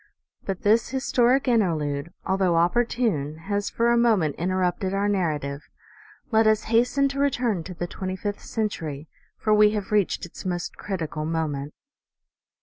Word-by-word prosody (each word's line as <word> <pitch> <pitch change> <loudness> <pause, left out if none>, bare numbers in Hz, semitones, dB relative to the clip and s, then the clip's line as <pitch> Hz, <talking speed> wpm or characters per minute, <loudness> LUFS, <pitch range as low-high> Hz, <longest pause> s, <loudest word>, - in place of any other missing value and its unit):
But 195 -2 -4
this 220 +3 +3
historic 265 0 +2
interlude, 165 - +1
although 190 -2 +2
opportune, 175 - +1
has 200 0 -1
for 235 +1 +1
a 235 - +4
moment 210 -11 +3
interrupted 185 +2 0
our 200 +1 +1
narrative. 150 -8 -1 0.7
Let 220 0 +4
us 215 -1 +3
hasten 250 +4 +3
to 275 0 -5
return 245 -10 +1
to 185 - -7
the 175 - -3
twenty 185 +1 -5
fifth 205 +2 -4
century, 160 -9 -4 0.3
for 215 - +1
we 210 0 +6
have 210 0 -4
reached 205 -4 +1
its 170 - -11
most 175 -2 -3
critical 165 -5 -4
moment. 155 -3 -2
195 Hz, 145 wpm, -25 LUFS, 165-225 Hz, 0.7 s, we